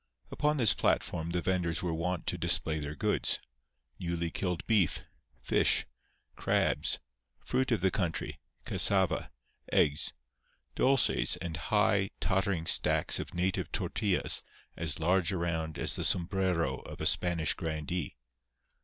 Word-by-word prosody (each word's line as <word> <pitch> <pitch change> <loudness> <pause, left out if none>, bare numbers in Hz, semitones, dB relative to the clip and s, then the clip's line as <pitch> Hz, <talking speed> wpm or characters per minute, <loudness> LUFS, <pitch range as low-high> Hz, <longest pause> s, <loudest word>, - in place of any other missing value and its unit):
Upon 150 0 0
this 115 -9 +5
platform 80 +1 -1
the 85 0 -2
venders 90 -3 -1
were 85 -2 -1
wont 85 +1 -3
to - - -1
display 80 -1 +1
their 75 0 -6
goods—newly 85 +8 -3
killed 90 -1 -3
beef, 105 -8 +1 0.4
fish, - - +2 0.5
crabs, - - 0 0.5
fruit 130 +1 0
of 110 -6 +1
the 95 0 +2
country, 90 -5 -3 0.3
cassava, 95 -2 +2 0.4
eggs, 75 0 +2 0.6
dulces 135 0 +3
and 85 -2 -5
high, 100 +4 +1
tottering 95 -3 0
stacks - - +3
of - - -7
native 90 +2 -1
tortillas 100 -4 +2 0.3
as 80 -3 0
large 90 +3 +1
around 80 -3 -3
as - - -2
the - - -3
sombrero 90 -1 0
of - - -11
a - - -3
Spanish 85 -3 +2
grandee. 80 -2 -4
90 Hz, 125 wpm, -30 LUFS, 80-95 Hz, 0.6 s, this